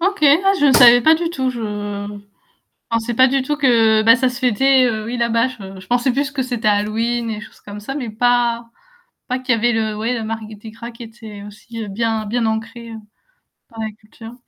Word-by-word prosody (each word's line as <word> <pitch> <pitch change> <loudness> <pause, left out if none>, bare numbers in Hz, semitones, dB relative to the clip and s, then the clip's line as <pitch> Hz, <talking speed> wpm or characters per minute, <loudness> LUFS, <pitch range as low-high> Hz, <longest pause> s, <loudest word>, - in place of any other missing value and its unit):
OK, 390 +3 0
ah 355 +8 +5
je 290 - +4
ne 270 - +5
savais 245 -1 +8
pas 315 +7 +5
du 335 +1 -2
tout, 260 -5 -2
je 240 -2 -7
je 205 -1 -6 0.6
pensais 230 +1 -2
pas 260 +2 +6
du 270 0 0
tout 295 +3 -2
que, 225 -6 +3
bah, 230 +1 +7
ça 255 0 +1
se 245 - -6
fêtait, 260 +2 +3
heu, 220 -3 -2
oui 245 - -4
là-bas 235 +1 +1
je, 195 -6 -10
je 185 - -15
pensais 245 +1 +1
plus 275 +1 -1
que 275 - -3
c'était 245 -3 -4
Halloween, 225 +3 0
des 215 -1 -4
choses - - -14
comme 205 0 -10
ça, 240 +6 -6
mais 245 -6 -4
pas 235 0 +1 0.6
pas 255 +1 -1
qu'il 250 -2 +1
y - - -1
avait 240 +2 +2
le 220 -1 -1
ouais 230 +3 -2
le - - -4
Mardi 220 -1 -6 0.2
Gras 230 +2 -9
qui 230 - -12
était 220 -3 -11
aussi, 230 +3 -11
heu, - - -9
bien 220 +1 -2
bien 235 +2 -1
ancré 230 +1 -4 0.8
dans 225 -2 -7
la 220 - -3
culture. 225 +1 -13
230 Hz, 225 wpm, -19 LUFS, 215-250 Hz, 0.8 s, savais